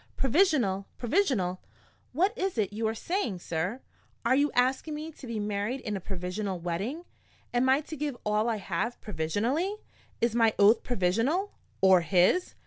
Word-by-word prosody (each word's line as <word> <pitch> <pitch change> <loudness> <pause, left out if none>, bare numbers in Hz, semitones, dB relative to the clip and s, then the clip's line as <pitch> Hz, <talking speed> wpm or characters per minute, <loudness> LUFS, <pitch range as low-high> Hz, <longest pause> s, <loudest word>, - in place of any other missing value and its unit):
"Provisional? 260 - +2
Provisional? 240 - +1 0.5
What 375 - +1
is 385 - -2
it 205 -2 0
you 220 +1 -1
are 220 - -1
saying, 330 - -2
sir? 175 +8 -3 0.4
Are 235 - +4
you 285 +2 +3
asking 260 +5 +1
me 310 +2 -6
to 280 -4 -12
be 230 -2 -3
married 205 +5 -2
in 210 - -3
a - - -2
provisional 185 +1 -4
wedding? 195 - -3 0.5
Am 245 +2 +2
I 270 +3 +4
to 310 - -8
give 290 -3 -3
all 210 +2 +1
I 230 - +1
have 200 +4 -3
provisionally? 225 - -1 0.4
Is 235 -1 +1
my 230 -2 +3
oath 210 +3 +6
provisional, 245 - 0 0.3
or 190 -2 +6
his?" 185 - +2
230 Hz, 160 wpm, -28 LUFS, 195-285 Hz, 0.5 s, oath